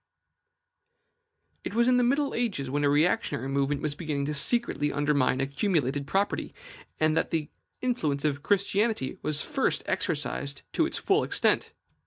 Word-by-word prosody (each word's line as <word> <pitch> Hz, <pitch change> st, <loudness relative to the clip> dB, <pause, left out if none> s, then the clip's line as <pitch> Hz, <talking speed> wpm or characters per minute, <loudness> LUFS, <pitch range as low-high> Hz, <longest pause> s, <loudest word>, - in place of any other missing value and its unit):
It 205 Hz, -, -5 dB
was 235 Hz, +1 st, +3 dB
in 250 Hz, 0 st, +4 dB
the 250 Hz, -, +3 dB
middle 275 Hz, +3 st, +1 dB
ages, 195 Hz, -, -2 dB
when 145 Hz, +1 st, 0 dB
a 145 Hz, -, +4 dB
reactionary 150 Hz, -, +1 dB
movement 140 Hz, +1 st, 0 dB
was 150 Hz, -1 st, 0 dB
beginning 145 Hz, -2 st, -3 dB
to 150 Hz, -, -2 dB
secretly 150 Hz, -, +1 dB
undermine 145 Hz, -3 st, +1 dB
accumulated 140 Hz, -, 0 dB
property, 200 Hz, +1 st, -1 dB, 0.4 s
that 155 Hz, 0 st, +2 dB
the 155 Hz, -3 st, -2 dB, 0.3 s
influence 155 Hz, -, -1 dB
of 145 Hz, -1 st, 0 dB
Christianity 200 Hz, -, 0 dB
was 150 Hz, 0 st, 0 dB
first -, -, 0 dB
exercised 65 Hz, +3 st, -2 dB
to -, -, +2 dB
its -, -, 0 dB
full -, -, +2 dB
extent. -, -, +1 dB
150 Hz, 145 wpm, -27 LUFS, 140-205 Hz, 0.4 s, in